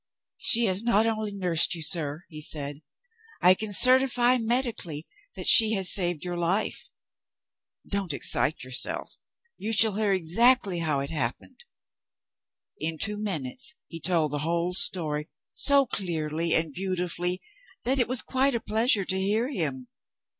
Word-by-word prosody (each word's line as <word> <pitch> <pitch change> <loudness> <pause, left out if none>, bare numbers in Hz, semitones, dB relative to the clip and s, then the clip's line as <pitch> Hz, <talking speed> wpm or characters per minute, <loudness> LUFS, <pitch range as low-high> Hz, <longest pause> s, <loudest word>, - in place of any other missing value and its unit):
'She 235 +1 +3
has 190 -1 +1
not 225 -2 +1
only 215 -2 -3
nursed 180 -5 +1
you, 165 - -6
sir,' 155 0 -1
he 155 -2 -11
said; 145 -1 -5 0.6
'I 180 - +5
can 215 +2 -6
certify 255 +2 +3
medically 225 - -4 0.3
that - - -6
she 225 -2 +10
has 195 -3 +3
saved 175 -4 +1
your 175 -1 -5
life. 180 +5 -3 1.0
Don't 200 -4 -3
excite 145 +1 0
yourself. 130 0 -2 0.4
You 220 +2 -3
shall 220 0 +6
hear 215 -2 0
exactly 195 +2 +2
how 155 -4 -2
it 140 - -6
happened.' 150 - -6 1.1
In 160 +1 -4
two 210 +4 -3
minutes, 210 - -3
he 165 - -10
told 165 -3 -1
the 145 - -3
whole 170 +3 -2
story, 155 -5 0 0.2
so 280 -1 +4
clearly 165 -5 -2
and 160 -2 -1
beautifully 180 0 -4 0.4
that 265 +2 0
it 245 - 0
was 255 0 -2
quite 265 0 -1
a - - -1
pleasure 220 -2 +1
to 190 +1 -1
hear 220 +7 -1
him. 140 - -3
185 Hz, 145 wpm, -25 LUFS, 160-225 Hz, 1.1 s, she